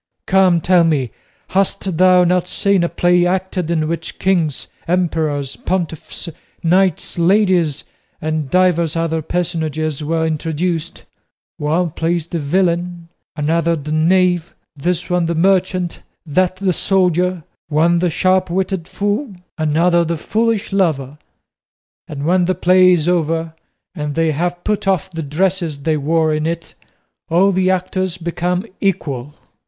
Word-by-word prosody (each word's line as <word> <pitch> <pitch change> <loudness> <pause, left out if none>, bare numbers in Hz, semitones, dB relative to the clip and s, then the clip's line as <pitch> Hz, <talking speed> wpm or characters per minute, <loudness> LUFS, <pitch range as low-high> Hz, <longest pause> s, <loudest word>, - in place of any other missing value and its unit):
Come, 185 -3 +3
tell 180 0 +4
me, 145 -7 0 0.4
hast 195 -2 0
thou 185 -1 +6
not 180 0 +1
seen 200 -2 +1
a 170 - 0
play 175 0 +2
acted 185 -2 -2
in 160 -2 0
which 165 0 -4
kings, 170 -7 0 0.2
emperors, 160 -6 -1
pontiffs, 175 -2 -4 0.4
knights, 180 0 +1
ladies, 175 -5 +2 0.4
and 155 -2 -2
divers 170 -2 +2
other 165 -1 -1
personages 155 -3 -2
were 160 +1 0
introduced? 160 +1 -2 0.5
One 160 +3 0
plays 165 +1 -1
the 170 0 -4
villain, 175 +2 -1 0.3
another 165 +2 +1
the 150 -1 -6
knave, 175 +1 +2 0.2
this 175 +4 -2
one 180 -2 0
the 170 - -1
merchant, 185 0 +1 0.2
that 180 +4 +1
the 185 -1 0
soldier, 180 -2 +1 0.3
one 165 +3 +3
the 180 0 +1
sharp 185 +3 +1
witted 185 -1 -2
fool, 205 +3 -2 0.2
another 170 +3 +2
the 165 0 -2
foolish 220 +3 -1
lover; 150 -7 0 0.9
and 145 -1 -5
when 180 +2 +3
the 185 +1 0
play 185 +1 +5
is 170 -3 +2
over, 165 -2 0 0.4
and 150 -1 -4
they 165 -1 +2
have 175 +3 -2
put 210 -2 -1
off 190 0 0
the 165 -2 -5
dresses 160 -1 -1
they 160 0 +1
wore 155 +2 +1
in 155 +1 -1
it, 165 0 -4 0.6
all 185 +4 +4
the 185 0 +1
actors 185 0 -1
become 175 +2 -2
equal." 150 -8 -2
170 Hz, 135 wpm, -18 LUFS, 160-185 Hz, 0.9 s, thou